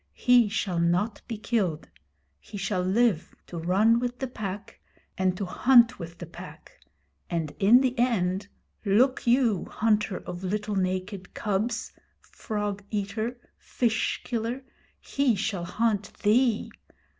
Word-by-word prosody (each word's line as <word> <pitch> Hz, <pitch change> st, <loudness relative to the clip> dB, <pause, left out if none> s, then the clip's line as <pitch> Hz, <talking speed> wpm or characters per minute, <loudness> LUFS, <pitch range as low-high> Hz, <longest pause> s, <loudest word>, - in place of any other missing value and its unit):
He 245 Hz, -3 st, +5 dB
shall 195 Hz, -4 st, -1 dB
not 180 Hz, +6 st, +1 dB
be 225 Hz, -2 st, -4 dB
killed. 205 Hz, -8 st, -1 dB, 0.5 s
He 210 Hz, -, -10 dB
shall 195 Hz, -1 st, -1 dB
live 190 Hz, -2 st, +1 dB
to 170 Hz, -, -7 dB
run 200 Hz, +7 st, +3 dB
with 245 Hz, 0 st, -3 dB
the 265 Hz, -, -3 dB
Pack 210 Hz, -5 st, -6 dB, 0.4 s
and 185 Hz, -1 st, 0 dB
to 200 Hz, -, -2 dB
hunt 240 Hz, +4 st, +5 dB
with 170 Hz, -1 st, -8 dB
the 175 Hz, -, -7 dB
Pack; 165 Hz, -, -12 dB, 0.6 s
and 165 Hz, -3 st, -2 dB
in 230 Hz, +6 st, +6 dB
the 260 Hz, -2 st, +1 dB
end, 200 Hz, -5 st, +1 dB, 0.4 s
look 240 Hz, +6 st, +2 dB
you, 235 Hz, -6 st, +3 dB
hunter 210 Hz, -3 st, 0 dB
of 175 Hz, +1 st, -8 dB
little 210 Hz, +2 st, -2 dB
naked 185 Hz, 0 st, -3 dB
cubs 215 Hz, +3 st, -1 dB, 0.3 s
frog 205 Hz, -2 st, -4 dB
eater 215 Hz, +4 st, -3 dB, 0.2 s
fish 230 Hz, -3 st, -1 dB
killer 235 Hz, +2 st, -3 dB, 0.4 s
he 275 Hz, -5 st, +1 dB
shall 200 Hz, -3 st, -2 dB
hunt 210 Hz, +1 st, 0 dB
thee! 225 Hz, +1 st, +2 dB
210 Hz, 135 wpm, -27 LUFS, 185-235 Hz, 0.6 s, in